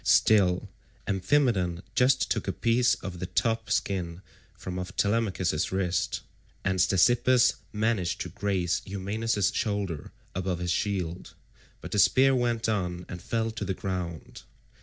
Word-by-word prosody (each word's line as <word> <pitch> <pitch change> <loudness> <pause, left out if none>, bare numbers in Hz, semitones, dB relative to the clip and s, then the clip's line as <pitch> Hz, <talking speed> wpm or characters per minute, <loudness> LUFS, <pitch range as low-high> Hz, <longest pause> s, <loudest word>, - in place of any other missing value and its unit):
Still, 95 -5 +4 0.4
Amphimedon 95 -4 +1
just 125 +1 +3
took - - -1
a - - +1
piece 120 +1 +2
of 90 -2 -6
the 90 - -4
top 115 +3 0
skin 90 -2 -1 0.3
from 90 0 -5
off 90 - -6
Telemachus's 100 -6 0
wrist, 90 -3 -1 0.4
and 95 -1 +1
Ctesippus 120 +7 +4
managed 105 -4 0
to - - -4
graze 95 -4 -1
Eumaeus's 100 +1 -1
shoulder 100 -8 -2 0.2
above 95 -1 -2
his 90 0 -2
shield; 90 -3 -2 0.5
but - - -8
the 105 - +1
spear 135 +8 +5
went 120 -2 0
on 90 -5 -2
and 90 -1 -7
fell 115 -1 -1
to 110 -1 -5
the 95 -1 -2
ground. 90 -4 -5
95 Hz, 140 wpm, -28 LUFS, 90-115 Hz, 0.5 s, spear